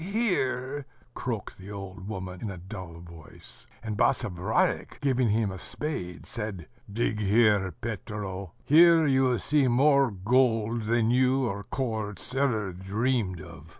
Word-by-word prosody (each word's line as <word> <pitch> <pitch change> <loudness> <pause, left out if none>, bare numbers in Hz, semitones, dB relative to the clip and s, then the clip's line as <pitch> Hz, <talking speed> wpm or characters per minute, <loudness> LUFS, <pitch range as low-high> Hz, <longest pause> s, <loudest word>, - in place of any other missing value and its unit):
"Here!" 145 - -1 0.3
croaked 115 -7 -5
the 95 +2 -10
old 100 -1 -8
woman, 95 -3 -6
in 110 - -3
a 100 - -6
dull 90 -2 -9
voice: 85 -3 -14 0.2
and 110 -2 -3
Basavriuk, 90 -7 0
giving 130 -4 +1
him 105 -1 +1
a 95 - -7
spade, 90 - -5
said: 105 -7 -5 0.2
"Dig 105 0 -1
here, 105 -2 +3
Petro: 100 -2 -6
here 165 +1 +7
you 135 -2 +3
will 125 -2 +2
see 145 +5 +2
more 140 +2 +4
gold 115 +2 +1
than 115 0 +2
you 130 +1 +3
or 100 -3 -3
Korzh 110 -5 -3
ever 110 -8 0
dreamed 100 +1 -1
of." 85 -3 -12
110 Hz, 140 wpm, -27 LUFS, 95-130 Hz, 0.3 s, here